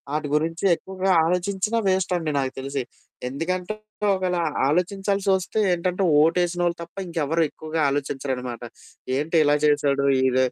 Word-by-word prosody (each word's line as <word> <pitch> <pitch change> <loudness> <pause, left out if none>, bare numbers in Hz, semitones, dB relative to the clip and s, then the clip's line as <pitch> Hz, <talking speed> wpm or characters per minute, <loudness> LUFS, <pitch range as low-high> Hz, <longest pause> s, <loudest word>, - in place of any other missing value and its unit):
ఆటి 150 -1 -2
గురించి 165 +4 -1
ఎక్కువగా 190 +2 -2
ఆలోచించిన 190 +5 0
వేస్ట్ 190 -1 +1
అండి 160 -3 -2
నాకు 130 -1 -1
తెలిసి. 135 0 -3 0.5
ఎందుకంటే 180 +8 -3 0.4
ఒకేలా 180 -2 -1 0.3
ఆలోచించాల్సి 195 +5 0
వస్తే 190 +3 -2
ఏంటంటే 180 +2 -1 0.2
ఓటు 165 +3 +3
ఏసినోళ్ళు 175 0 0
తప్ప 170 +2 -10
ఇంకెవరు 165 -1 0
ఎక్కువగా 155 +1 -5
ఆలోచించరనమాట. 135 -3 -3 0.5
ఏంటి 150 +4 -1
ఇలా 145 0 +3
చేశాడు 145 -2 +2 0.2
ఇద 130 0 +1
165 Hz, 130 wpm, -24 LUFS, 145-185 Hz, 0.5 s, ఓటు